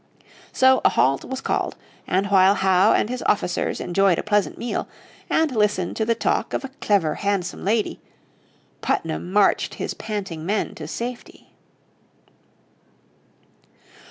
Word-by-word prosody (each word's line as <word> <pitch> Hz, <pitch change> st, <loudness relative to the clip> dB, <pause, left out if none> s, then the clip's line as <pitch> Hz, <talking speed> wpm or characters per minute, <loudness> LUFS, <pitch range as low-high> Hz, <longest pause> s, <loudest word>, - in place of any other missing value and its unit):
So 260 Hz, 0 st, +4 dB
a -, -, +6 dB
halt 135 Hz, +2 st, +1 dB
was 265 Hz, 0 st, -5 dB
called, -, -, -1 dB, 0.3 s
and 190 Hz, +2 st, +1 dB
while 190 Hz, 0 st, +5 dB
Howe 190 Hz, -1 st, +4 dB
and -, -, +2 dB
his 250 Hz, +2 st, -4 dB
officers 180 Hz, -4 st, 0 dB
enjoyed 190 Hz, -1 st, +2 dB
a -, -, -2 dB
pleasant 210 Hz, -1 st, 0 dB
meal, 240 Hz, -, -3 dB, 0.4 s
and 315 Hz, -5 st, +1 dB
listened 210 Hz, -4 st, +1 dB
to 220 Hz, -, 0 dB
the 230 Hz, +1 st, +1 dB
talk -, -, -1 dB
of -, -, -2 dB
a -, -, -7 dB
clever, 185 Hz, -7 st, +2 dB
handsome 195 Hz, -3 st, -2 dB
lady, 215 Hz, +2 st, 0 dB, 0.8 s
Putnam 165 Hz, +2 st, -2 dB
marched 205 Hz, 0 st, +2 dB
his -, -, -4 dB
panting 195 Hz, -7 st, -5 dB
men 200 Hz, +5 st, -1 dB
to 155 Hz, -, -8 dB
safety. 240 Hz, +8 st, -7 dB
200 Hz, 135 wpm, -23 LUFS, 180-225 Hz, 0.8 s, a